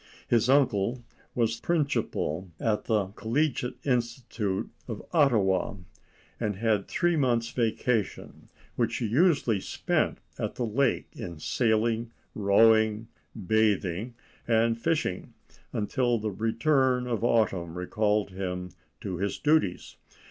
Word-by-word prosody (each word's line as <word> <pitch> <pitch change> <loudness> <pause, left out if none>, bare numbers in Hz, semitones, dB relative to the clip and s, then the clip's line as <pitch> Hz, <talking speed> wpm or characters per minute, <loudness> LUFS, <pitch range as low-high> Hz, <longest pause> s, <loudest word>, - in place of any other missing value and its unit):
His 115 0 +2
uncle 120 -3 +2 0.3
was 115 -1 0
principal 140 - -1
of 110 -2 0
the 105 -4 +1
Collegiate 125 +4 -1
Institute 120 -6 -1 0.2
at - - -3 0.2
Ottawa, 105 - +3 0.6
and 105 -2 -1
had 105 -1 0
three 175 0 +1
months' 120 -5 +1
vacation, 115 -2 -2 0.3
which 115 -1 0
he 120 - -2
usually 125 - +3
spent - - -1 0.2
at - - -3
the 125 - -1
lake 125 +4 0
in 85 -2 -7
sailing, 115 +5 0 0.2
rowing, 110 +2 +3 0.4
bathing, 105 +1 +1 0.3
and 115 0 +3
fishing, 150 - -2 0.4
until 120 +3 0
the 110 -1 -3
return 125 +5 +1
of 115 -3 -2
autumn 95 -8 +1
recalled 105 +2 0
him 90 -1 -4 0.3
to 95 -3 -4
his 100 +3 -2
duties. 150 - +1
115 Hz, 110 wpm, -28 LUFS, 100-125 Hz, 0.6 s, Ottawa